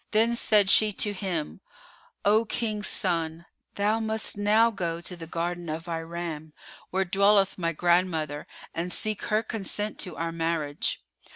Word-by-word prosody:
Then 225 Hz, +2 st, +4 dB
said 210 Hz, -4 st, +4 dB
she 215 Hz, -1 st, +5 dB
to 205 Hz, +1 st, 0 dB
him, 185 Hz, -6 st, -3 dB, 0.6 s
"O 215 Hz, +2 st, +5 dB
King's 215 Hz, -2 st, -2 dB
son, 165 Hz, -2 st, -1 dB, 0.3 s
thou 210 Hz, +2 st, +1 dB
must 220 Hz, 0 st, -1 dB
now 215 Hz, +3 st, +4 dB
go 170 Hz, -5 st, -3 dB
to 180 Hz, +1 st, -5 dB
the 165 Hz, -1 st, -9 dB
garden 170 Hz, +1 st, -3 dB
of 160 Hz, +2 st, -4 dB
Iram, 165 Hz, -2 st, -5 dB, 0.4 s
where 190 Hz, +1 st, 0 dB
dwelleth 195 Hz, +1 st, +3 dB
my 165 Hz, -1 st, 0 dB
grandmother, 165 Hz, -3 st, +1 dB, 0.3 s
and 175 Hz, +2 st, -3 dB
seek 215 Hz, +2 st, 0 dB
her 215 Hz, 0 st, +1 dB
consent 210 Hz, -1 st, -3 dB
to 180 Hz, -5 st, -2 dB
our 165 Hz, 0 st, -2 dB
marriage. 165 Hz, -3 st, -2 dB
180 Hz, 150 wpm, -27 LUFS, 165-210 Hz, 0.6 s, she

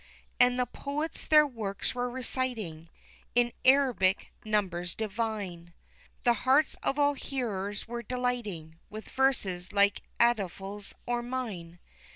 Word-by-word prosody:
And 245 Hz, 0 st, +5 dB
the 250 Hz, -, +2 dB
poets 290 Hz, +6 st, -4 dB
their 305 Hz, -1 st, +7 dB
works 220 Hz, -8 st, -3 dB
were 245 Hz, 0 st, -1 dB
reciting 235 Hz, -10 st, -3 dB, 0.5 s
in 240 Hz, -1 st, +3 dB
Arabic 255 Hz, -9 st, +4 dB
numbers 185 Hz, -5 st, -1 dB
divine, 205 Hz, -6 st, -3 dB, 0.5 s
The 240 Hz, -, +5 dB
hearts 270 Hz, +3 st, +4 dB
of 275 Hz, -, 0 dB
all 290 Hz, 0 st, +4 dB
hearers 210 Hz, -8 st, -3 dB, 0.2 s
delighting 220 Hz, -11 st, -2 dB
with 215 Hz, +1 st, -8 dB
verses 200 Hz, -9 st, +1 dB
like 200 Hz, 0 st, +4 dB, 0.2 s
Afdhal's 200 Hz, -3 st, 0 dB
or 240 Hz, 0 st, 0 dB
mine. 220 Hz, -9 st, -5 dB
225 Hz, 115 wpm, -30 LUFS, 195-255 Hz, 0.5 s, their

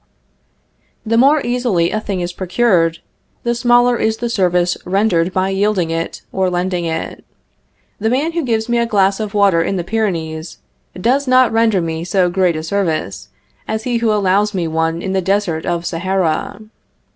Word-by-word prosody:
The 225 Hz, +1 st, 0 dB
more 280 Hz, +5 st, +4 dB
easily 240 Hz, -9 st, 0 dB
a 215 Hz, -, -1 dB
thing 195 Hz, -4 st, -3 dB
is 175 Hz, 0 st, -4 dB
procured, 180 Hz, -3 st, +1 dB, 0.4 s
the 235 Hz, -, 0 dB
smaller 240 Hz, 0 st, +3 dB
is 220 Hz, 0 st, 0 dB
the 240 Hz, 0 st, -3 dB
service 180 Hz, -4 st, +1 dB
rendered 185 Hz, -2 st, +1 dB
by 185 Hz, +1 st, 0 dB
yielding 195 Hz, -3 st, 0 dB
it 165 Hz, 0 st, -4 dB
or 190 Hz, -1 st, 0 dB
lending 180 Hz, 0 st, -1 dB
it. 160 Hz, -1 st, -4 dB, 0.8 s
The 220 Hz, +2 st, 0 dB
man 280 Hz, +7 st, 0 dB
who 335 Hz, 0 st, -1 dB
gives 225 Hz, -3 st, -1 dB
me 240 Hz, 0 st, +1 dB
a 235 Hz, -, +1 dB
glass 195 Hz, -2 st, +2 dB
of 210 Hz, -1 st, -4 dB
water 200 Hz, -5 st, +4 dB
in 180 Hz, +4 st, -1 dB
the 175 Hz, -, -2 dB
Pyrenees, 170 Hz, -6 st, -3 dB, 0.4 s
does 260 Hz, +8 st, +1 dB
not 255 Hz, -1 st, +4 dB
render 225 Hz, -4 st, +2 dB
me 165 Hz, 0 st, -3 dB
so 180 Hz, 0 st, +1 dB
great 180 Hz, -2 st, +1 dB
a 155 Hz, -, -4 dB
service 165 Hz, -, -2 dB, 0.4 s
as 220 Hz, 0 st, -3 dB
he 245 Hz, -1 st, 0 dB
who 230 Hz, -1 st, +1 dB
allows 205 Hz, 0 st, +1 dB
me 175 Hz, -3 st, -1 dB
one 165 Hz, +1 st, -1 dB
in 190 Hz, -, -2 dB
the 190 Hz, -, +1 dB
desert 190 Hz, -4 st, -1 dB
of 175 Hz, -1 st, -1 dB
Sahara. 185 Hz, +2 st, -1 dB
195 Hz, 175 wpm, -17 LUFS, 175-225 Hz, 0.8 s, more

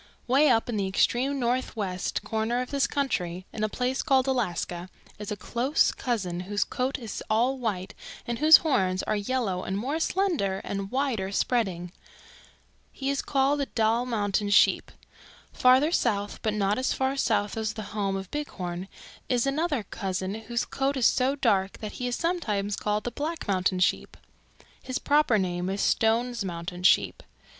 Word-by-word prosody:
"Way 275 Hz, +4 st, +4 dB
up 225 Hz, -3 st, +3 dB
in 235 Hz, -3 st, -2 dB
the 195 Hz, -1 st, 0 dB
extreme 255 Hz, +8 st, +1 dB
northwest 230 Hz, -7 st, -2 dB
corner 225 Hz, +2 st, -1 dB
of 250 Hz, -, -4 dB
this 275 Hz, -3 st, +2 dB
country, 185 Hz, -11 st, -2 dB
in 215 Hz, -, -3 dB
a 215 Hz, -, +1 dB
place 250 Hz, +4 st, -1 dB
called 265 Hz, -4 st, +3 dB
Alaska, 185 Hz, -8 st, -2 dB, 0.3 s
is 210 Hz, -1 st, -6 dB
a -, -, -1 dB
close 240 Hz, -, +1 dB
cousin 195 Hz, -8 st, -2 dB
whose 205 Hz, +3 st, -1 dB
coat 255 Hz, +3 st, -2 dB
is 230 Hz, -6 st, -6 dB
all 245 Hz, +5 st, +2 dB
white 200 Hz, -6 st, -3 dB, 0.3 s
and 235 Hz, -1 st, -3 dB
whose 310 Hz, +2 st, +9 dB
horns 185 Hz, -11 st, +1 dB
are -, -, 0 dB
yellow 205 Hz, -3 st, -1 dB
and 190 Hz, -, -3 dB
more 275 Hz, +9 st, -2 dB
slender 325 Hz, -, 0 dB
and 195 Hz, -1 st, -4 dB
wider 245 Hz, -7 st, -1 dB
spreading. 190 Hz, -6 st, -1 dB, 1.0 s
He 275 Hz, 0 st, -2 dB
called 275 Hz, +1 st, +1 dB
the 280 Hz, -, -1 dB
Dall 230 Hz, +2 st, +1 dB
Mountain 205 Hz, -3 st, 0 dB
Sheep. 205 Hz, -, +4 dB, 0.6 s
Farther 260 Hz, +5 st, +4 dB
south, 205 Hz, -, 0 dB
but 215 Hz, -1 st, -1 dB
not 205 Hz, +2 st, +1 dB
as 260 Hz, -, 0 dB
far 265 Hz, +1 st, 0 dB
south 210 Hz, -6 st, 0 dB
as 220 Hz, -1 st, -2 dB
the 215 Hz, -, -6 dB
home 200 Hz, -2 st, -1 dB
of 190 Hz, -1 st, -6 dB
Bighorn, 185 Hz, -11 st, -4 dB, 0.4 s
is 245 Hz, -1 st, +2 dB
another 290 Hz, -2 st, 0 dB
cousin 190 Hz, -1 st, -3 dB
whose 230 Hz, +2 st, -3 dB
coat 275 Hz, +1 st, -1 dB
is 250 Hz, -, +2 dB
so 265 Hz, +2 st, +3 dB
dark 200 Hz, -8 st, +1 dB
that 215 Hz, -1 st, -6 dB
he 250 Hz, -, -1 dB
is 245 Hz, -, -1 dB
sometimes 210 Hz, -, -1 dB
called 210 Hz, 0 st, -1 dB
the 240 Hz, -, -3 dB
Black 310 Hz, +5 st, -4 dB
Mountain 185 Hz, -1 st, +1 dB
Sheep. -, -, 0 dB, 0.6 s
His 255 Hz, 0 st, -3 dB
proper 290 Hz, -6 st, +3 dB
name 180 Hz, -1 st, -1 dB
is 195 Hz, +1 st, -2 dB
Stone's 235 Hz, +2 st, +1 dB
Mountain 175 Hz, 0 st, -5 dB
Sheep. -, -, +4 dB
225 Hz, 165 wpm, -27 LUFS, 195-265 Hz, 1.0 s, whose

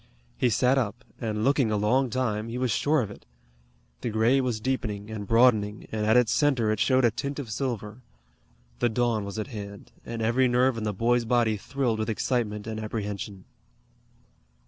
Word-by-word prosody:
He 125 Hz, -, +2 dB
sat 125 Hz, +4 st, +3 dB
up, 120 Hz, 0 st, -3 dB, 0.2 s
and 110 Hz, -3 st, -2 dB
looking 135 Hz, -2 st, +3 dB
a 105 Hz, -, +1 dB
long 125 Hz, +6 st, +2 dB
time, 110 Hz, -3 st, -1 dB
he 120 Hz, -, -4 dB
was 125 Hz, -2 st, 0 dB
sure 150 Hz, +6 st, +2 dB
of 105 Hz, -, -6 dB
it. -, -, -12 dB, 0.8 s
The -, -, -2 dB
gray 115 Hz, +5 st, +3 dB
was 125 Hz, -4 st, -1 dB
deepening 110 Hz, -4 st, -3 dB
and 105 Hz, -2 st, -5 dB
broadening, 110 Hz, -3 st, +3 dB
and 105 Hz, -1 st, -1 dB
at 110 Hz, +3 st, +5 dB
its 125 Hz, -3 st, +3 dB
center 130 Hz, -7 st, +2 dB
it 110 Hz, -, -1 dB
showed 130 Hz, +1 st, +3 dB
a 115 Hz, -, +4 dB
tint 140 Hz, +5 st, -4 dB
of 130 Hz, -7 st, -5 dB
silver. 115 Hz, -2 st, -4 dB, 0.8 s
The 120 Hz, -, +2 dB
dawn 115 Hz, -2 st, 0 dB
was 100 Hz, +1 st, -6 dB
at 110 Hz, -, -4 dB
hand, 100 Hz, -4 st, -8 dB
and 115 Hz, -1 st, -5 dB
every 125 Hz, +3 st, +3 dB
nerve 125 Hz, +1 st, +3 dB
in 110 Hz, -1 st, -4 dB
the 105 Hz, -, 0 dB
boy's 120 Hz, +3 st, +2 dB
body 115 Hz, -2 st, +2 dB
thrilled 120 Hz, +1 st, -2 dB
with 110 Hz, -, -1 dB
excitement 110 Hz, -2 st, -1 dB
and 110 Hz, -1 st, -4 dB
apprehension. 105 Hz, -3 st, -5 dB
115 Hz, 190 wpm, -27 LUFS, 105-125 Hz, 0.8 s, at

